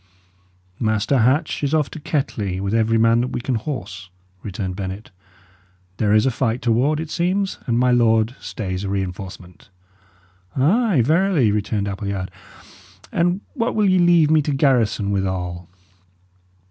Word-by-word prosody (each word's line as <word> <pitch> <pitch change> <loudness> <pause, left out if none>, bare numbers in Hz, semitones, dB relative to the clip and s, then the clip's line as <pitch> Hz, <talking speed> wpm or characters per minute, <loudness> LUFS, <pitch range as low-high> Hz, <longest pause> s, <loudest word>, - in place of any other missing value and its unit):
"Master 110 +4 +1
Hatch 140 +8 +1
is 145 +2 +1
off 150 -3 0
to 160 - -8
Kettley, 105 - -2
with 100 +2 -2
every 115 0 +2
man 115 +1 +4
that 125 - -1
we - - -4
can 130 +2 -2
horse," 105 -6 -5 0.3
returned 95 -2 -5
Bennet. 95 +2 -6 0.9
"There 105 +1 +1
is 110 +3 +4
a 135 - +2
fight 115 0 -1
toward, 125 +6 +2
it 160 -1 -5
seems, 190 +3 -1
and 115 -1 +1
my 125 +1 +3
lord 115 0 +3
stays 95 -4 -5
a 100 - -3
reinforcement." 95 -2 -6 0.9
"Ay, 175 - +3
verily," 160 - +3
returned 105 0 -1
Appleyard. 100 -1 -4 0.8
"And 175 +3 +1
what 235 -4 -1
will 210 -2 +3
ye 185 -1 +4
leave 170 -3 +4
me 155 -1 +5
to 150 - -2
garrison 125 -7 +2
withal?" 90 -3 -3
115 Hz, 145 wpm, -21 LUFS, 100-150 Hz, 0.9 s, me